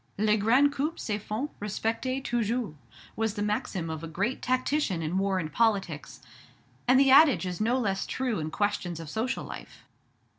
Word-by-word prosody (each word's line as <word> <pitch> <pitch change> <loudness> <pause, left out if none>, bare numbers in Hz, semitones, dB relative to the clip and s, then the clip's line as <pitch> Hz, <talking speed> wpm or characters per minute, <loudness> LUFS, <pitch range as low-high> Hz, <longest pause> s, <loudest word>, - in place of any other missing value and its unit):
"Les 210 +1 +3
grands 250 +7 +4
coups 305 +5 -2
se 210 -2 -2
font 220 +8 -4
respecter 225 +5 -2
toujours," 240 - -1 0.4
was 220 -1 -1
the 205 - -2
maxim 210 -4 -2
of 160 0 -5
a - - -4
great 200 +10 -2
tactician 255 - 0
in 170 +5 -1
war 195 -1 +1
and 160 -4 -3
politics; 195 -9 0 0.7
and 255 +1 +6
the 270 -1 +5
adage 280 -6 +6
is 180 0 -4
no 235 +4 +2
less 195 -6 -1
true 250 -7 -1
in 155 0 -3
questions 180 -2 -1
of 160 -2 -7
social 245 +4 -2
life. - - -10
215 Hz, 175 wpm, -28 LUFS, 190-255 Hz, 0.7 s, and